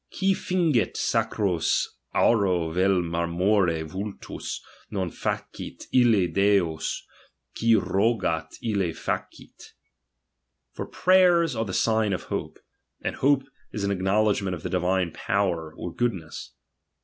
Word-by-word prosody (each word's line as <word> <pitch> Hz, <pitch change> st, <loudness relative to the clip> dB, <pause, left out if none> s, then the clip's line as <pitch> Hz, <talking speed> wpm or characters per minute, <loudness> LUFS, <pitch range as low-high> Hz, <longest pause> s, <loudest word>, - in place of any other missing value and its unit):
" -, -, -55 dB
Qui 195 Hz, +1 st, +1 dB
fingit 170 Hz, -10 st, +1 dB
sacros 105 Hz, -6 st, +1 dB, 0.3 s
auro 90 Hz, -7 st, +3 dB
vel 90 Hz, +1 st, +2 dB
marmore 85 Hz, +1 st, +1 dB
vultus. 95 Hz, +6 st, -6 dB, 0.3 s
Noil 95 Hz, -5 st, -2 dB
facit -, -, -5 dB
ille 115 Hz, -7 st, +5 dB
decs; 95 Hz, -5 st, +1 dB, 0.5 s
qui 115 Hz, 0 st, +3 dB
rogat, 95 Hz, -7 st, 0 dB
i!le 100 Hz, -7 st, 0 dB
facit." -, -, -6 dB, 1.0 s
For -, -, -6 dB
prayers 175 Hz, -5 st, +4 dB
are 115 Hz, 0 st, -1 dB
the 95 Hz, -, -5 dB
signs 110 Hz, -3 st, +2 dB
of -, -, -6 dB
hope; -, -, -4 dB, 0.5 s
and -, -, -3 dB
hope 140 Hz, 0 st, +3 dB, 0.3 s
is 105 Hz, -, -4 dB
an 100 Hz, -, 0 dB
acknowledgment 100 Hz, 0 st, +1 dB
of 80 Hz, -, -11 dB
the -, -, -3 dB
divine 90 Hz, -1 st, +1 dB
power 85 Hz, -6 st, -1 dB
or 85 Hz, -, -5 dB
goodness. 95 Hz, -10 st, -3 dB
100 Hz, 120 wpm, -26 LUFS, 90-115 Hz, 1.0 s, ille